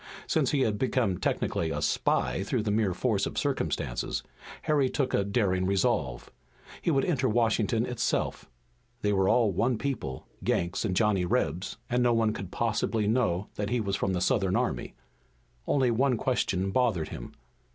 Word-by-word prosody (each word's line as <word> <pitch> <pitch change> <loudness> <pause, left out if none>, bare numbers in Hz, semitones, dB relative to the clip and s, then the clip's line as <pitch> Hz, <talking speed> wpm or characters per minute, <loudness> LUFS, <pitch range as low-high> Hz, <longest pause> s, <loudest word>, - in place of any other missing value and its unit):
Since 150 -5 +1
he 145 - +1
had 105 -5 +1
become 120 -8 +1
technically 80 - -1
a - - -2
spy - - +1
through 105 +3 -1
the 105 - 0
mere 105 -2 +2
force 110 -6 +1
of - - -7
circumstances, - - -1 0.4
Harry 145 -4 +2
took 135 -2 -1
a 100 - +3
daring 100 -3 +1
resolve. 95 - 0 0.5
He - - 0
would 135 -4 +2
enter 135 -7 +1
Washington 115 0 +2
itself. 125 0 -2 0.5
They 105 0 +2
were 95 -1 +2
all 115 -4 +4
one 115 +6 +1
people, 115 - -4 0.2
Yanks 85 0 0
and 95 -4 -1
Johnny 105 -3 +2
Rebs, 90 +2 -1
and 125 0 +1
no 120 -1 +4
one 110 -2 +2
could 95 -4 -6
possibly 110 0 0
know 105 -4 +1
that 105 -1 -2
he 125 - +1
was 100 -3 -1
from 95 - -1
the 90 - -1
Southern 95 -4 +2
army. - - -1 0.7
Only 130 -4 +3
one 125 +1 +2
question 95 -6 0
bothered 105 -10 +1
him. - - -8
110 Hz, 170 wpm, -28 LUFS, 95-125 Hz, 0.7 s, all